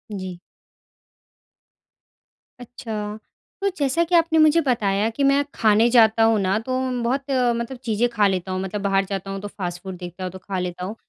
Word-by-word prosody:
जी। 185 -2 -6 2.2
अच्छा। 215 -3 -6 0.4
तो 395 - +2
जैसा 285 +4 +1
कि 345 +1 0
आपने 325 -1 +3
मुझे 310 +2 +5
बताया 220 -6 +1
कि 280 +5 -3
"मैं 275 +1 +4
खाने 220 +1 +4
जाता 225 -2 +5
हूँ 225 -1 +4
ना 195 +1 +1
तो 255 0 0 0.3
बहुत 265 +4 0 0.3
मतलब 235 +2 -4
चीज़ें 230 0 +1
खा 210 -3 +2
लेता 190 -1 -2
हूँ। 185 0 -2
मतलब 195 +2 -4
बाहर 195 -1 +1
जाता 195 0 -5
हूँ 195 - -4
तो 205 - -5
फास्ट 180 -3 -6
फूड 190 -1 -6
देखता 180 +1 -8
हूँ 185 - -4
तो 190 - -10
खा 190 0 -4
लेता 180 0 -4
हूँ।" 205 +4 -6
210 Hz, 185 wpm, -22 LUFS, 190-245 Hz, 2.2 s, मुझे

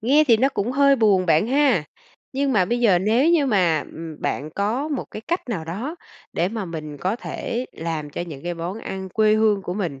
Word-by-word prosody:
Nghe 280 +7 +4
thì 230 - +7
nó 265 +5 +3
cũng 245 -2 -2
hơi 280 0 +4
buồn 200 -5 +3
bạn 165 +5 +3
ha, 260 - +3 0.5
nhưng 275 0 0
mà 190 -5 +4
bây 240 +5 -1
giờ 200 -7 +5
nếu 230 - +3
như 310 -5 +3
mà, 180 -9 +3
ừm, 160 -2 -8
bạn 150 +3 -2
có 230 +9 -1
một 285 -4 -2
cái 215 - -7
cách 345 -6 -2
nào 175 -9 -3
đó 230 - -5 0.4
để 175 - 0
mà 220 -2 -4
mình 155 -3 -6
có 185 +9 -1
thể 245 +1 -4
làm 160 -3 -4
cho - - -5
những 170 +1 -5
món 180 +6 -4
ăn 190 -3 -6
quê 215 +2 +3
hương 215 -2 +2
của 180 - -4
mình 170 -10 -3
210 Hz, 220 wpm, -22 LUFS, 170-250 Hz, 0.5 s, thì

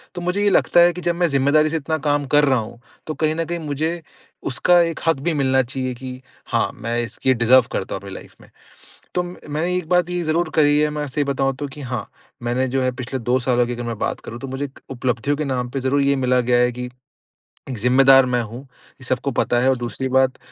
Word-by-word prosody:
तो 175 - -5
मुझे 180 +4 -1
ये 205 - +4
लगता 180 - +3
है 175 0 +6
कि 180 - -7
जब 175 -1 0
मैं 175 0 +2
ज़िम्मेदारी 145 +2 +3
से 160 - -1
इतना 160 +1 -2
काम 145 0 +1
कर 145 0 +6
रहा 130 -3 +3
हूँ, 115 +1 -8 0.3
तो 155 - -2
कहीं 155 0 0
न 165 0 -1
कहीं 170 +1 -4
मुझे 160 +2 -3 0.5
उसका 175 +7 +4
एक 165 -1 -1
हक 165 - +4
भी 170 - +2
मिलना 130 -2 +2
चाहिए 130 +1 -4
कि 125 +1 -8 0.3
हाँ, - - +1
मैं 115 +1 -3
इसक 115 - -10
ये 130 - +6
डिज़र्व 120 +1 +5
करता - - -3
हूँ 95 - -6
अपनी 100 -1 -9
लाइफ़ - - -12
में। - - -18 0.7
तो 180 - +1
म - - -6 0.2
मैंने 170 +5 -1
एक 180 - -4
बात 180 -1 +2
ये 180 0 -2
ज़रूर 160 +1 0
करी 145 -1 +4
है, 150 0 +2
मैं 150 0 -4
सही 145 +2 -1
बताऊँ, 135 -1 0
तो 145 +2 -5
कि 140 +2 -10
हाँ, 125 -4 -4 0.4
मैंने 125 +2 0
जो 130 +1 -1
है, 130 0 +1
पिछले 130 +1 -5
2 125 +2 +1
सालों 120 -1 +2
की 120 - -3
अगर 120 0 -5
मैं 115 -2 -4
बात - - -2
करूँ, 115 - -8
तो 135 - -6
मुझे 135 +2 -3
एक 135 - -12
उपलब्धियों 130 +2 -1
के 155 - -2
नाम 125 -2 -2
पे 135 +2 -3
ज़रूर 135 +2 +1
ये 140 0 +2
मिला 125 -1 +2
गया 120 0 +4
है 125 0 +2
कि 125 +1 -6 0.9
एक 130 - -4
ज़िम्मेदार 135 +3 +6
मैं 125 -1 0
हूँ, 115 +3 -8
ये 130 0 -19
सबको 130 +2 -1
पता 120 - +2
है 130 - +2
और 130 - +3
दूसरी 120 +2 -3
बात, 130 0 +2
135 Hz, 255 wpm, -21 LUFS, 125-155 Hz, 0.9 s, है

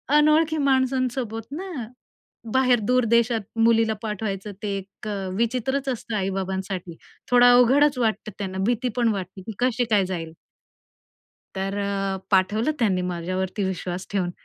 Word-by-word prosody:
अनोळखी 305 +1 +4
माणसांसोबत 260 -5 0
ना? 365 +6 -5 0.9
बाहेर 255 -2 +4
दूर 250 -1 +3
देशात 235 -1 +3 0.2
मुलीला 225 -1 +4
पाठवायचं 210 -2 -4
ते 210 - -2
एक 195 +2 -10
अ, 195 -2 -3
विचित्रच 255 +4 0
असतं 230 -2 -4
आई-बाबांसाठी. 190 -2 -3 0.3
थोडा 245 0 +7
अवघडच 265 +3 +5
वाटतं 220 -2 -1
त्यांना, 190 -2 -4
भीती 245 +1 +1
पण 240 -2 +3
वाटते, 190 -1 -6
की 220 - -6
कशी 245 -1 +2
काय 200 -3 +4
जाईल? 165 -3 -5 1.2
तर 195 +1 -2
अ, 195 -1 -1
पाठवलं 205 +7 +2
त्यांनी 195 -7 +1
माझ्यावरती 185 +3 -2
विश्वास 185 -1 -4
ठेवून 190 -3 0
220 Hz, 135 wpm, -24 LUFS, 190-250 Hz, 1.2 s, थोडा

